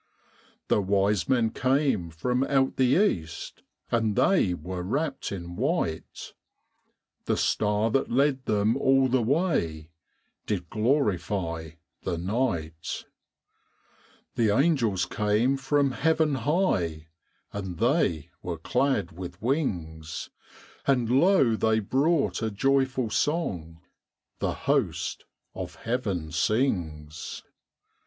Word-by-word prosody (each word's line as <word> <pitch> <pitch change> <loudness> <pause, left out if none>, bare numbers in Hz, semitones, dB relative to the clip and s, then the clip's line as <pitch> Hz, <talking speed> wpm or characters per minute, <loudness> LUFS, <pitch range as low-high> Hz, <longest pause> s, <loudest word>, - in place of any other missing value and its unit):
The 105 - +3
wise 100 +1 +1
men 120 -4 +3
came 130 - +1
from 125 +11 -1
out 135 -1 +1
the 130 +2 +4 0.2
east, 80 -1 -8 0.3
And 110 -3 +1
they 125 - +3
were 90 +2 -5
wrapped 135 - -2
in 90 -3 -6
white; 125 - -2 0.9
The - - +1
star 105 +1 +1
that 135 - +1
led 135 +1 +2
them 105 +2 +2
all 135 -1 +4
the 130 0 +2
way 110 - 0 0.6
Did 90 -5 -3
glorify 95 - 0 0.3
the 90 -2 -2
night. 85 -5 -2 1.3
The 115 -2 +2
angels 120 - +2
came 105 +6 +1
from 140 0 +1
heaven 160 +1 +2
high, 115 - 0 0.4
And 95 -4 -5
they 115 - +1
were 85 -2 -4
clad 125 - 0
with 90 +1 -8
wings; 85 - -2 0.6
And 125 -4 +2
lo, 135 - +4
they 110 0 +2
brought 140 - +1
a 110 - 0
joyful 130 +1 +1
song 90 - -1 0.6
The - - 0
host - - 0 0.3
of - - -6
heaven 100 -10 -2
sings. 80 - -1
110 Hz, 105 wpm, -27 LUFS, 90-135 Hz, 1.3 s, the